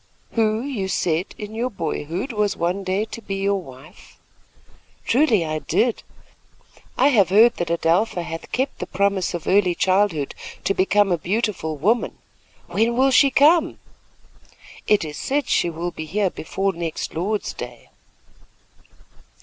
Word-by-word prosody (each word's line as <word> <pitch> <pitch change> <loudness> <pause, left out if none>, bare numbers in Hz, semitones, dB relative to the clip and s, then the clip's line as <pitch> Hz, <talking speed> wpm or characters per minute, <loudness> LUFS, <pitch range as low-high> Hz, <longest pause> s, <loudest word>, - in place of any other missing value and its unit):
"Who, 220 0 +1
you 245 -9 -3
said 175 -1 -1
in 210 0 -7
your 235 +3 -1
boyhood, 175 - -4
was 210 -1 0
one 180 +4 -1
day 190 +3 0
to 230 - -9
be 195 -2 -4
your 195 0 0
wife." 140 +4 -15 0.9
"Truly, 235 - +3
I 155 0 -2
did. 215 +10 0 1.0
I 280 - +5
have 205 -10 +4
heard 220 +5 +5
that 175 - -2
Adelpha 170 +3 +1
hath 165 0 -7
kept 265 +2 -2
the - - -4
promise 195 -2 0
of 170 - -6
early 185 -2 +3
childhood 185 -7 +1 0.3
to 195 - +1
make 190 +2 0
a 200 -4 +4
beautiful 185 -5 -2
woman. 220 - 0 0.5
When 235 +2 0
will 270 +1 +4
she 275 +1 +6
come?" 300 +6 +4 1.1
"It 210 -5 +3
is 150 -1 -7
said 280 -1 -1
she 175 - +2
will 170 +2 -4
be 155 - -7
here 200 +1 0
before 195 +4 -2
next 165 -1 -4
Lord's 200 +6 -2
Day." - - -9
195 Hz, 150 wpm, -22 LUFS, 170-225 Hz, 1.1 s, she